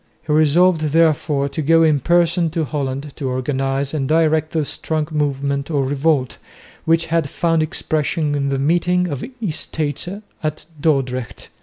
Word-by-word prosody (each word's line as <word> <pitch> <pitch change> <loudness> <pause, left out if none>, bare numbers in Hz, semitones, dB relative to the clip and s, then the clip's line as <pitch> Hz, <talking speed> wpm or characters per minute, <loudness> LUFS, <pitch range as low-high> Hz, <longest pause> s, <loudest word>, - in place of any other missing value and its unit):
He 150 - 0
resolved 160 +3 +4
therefore 155 -2 +2
to 155 - -3
go 165 +2 +4
in 155 -3 +3
person 170 +3 +2
to 160 0 -1
Holland 140 -1 -4
to 135 -3 -3
organise 135 +2 -1
and 140 -4 -2
direct 160 -1 +2
the 160 -2 0
strong 155 +1 -2
movement 140 -1 -1
of 140 -4 0
revolt, 140 -1 0 0.5
which 165 0 +3
had 165 -4 +1
found 165 +1 +1
expression 155 -1 -1
in 140 -1 0
the 135 - 0
meeting 175 +5 +1
of 145 -6 -4
the - - -6 0.2
Estates 155 -1 -3 0.3
at 155 -1 -3 0.2
Dordrecht. 130 -5 -1
150 Hz, 155 wpm, -19 LUFS, 140-165 Hz, 0.5 s, resolved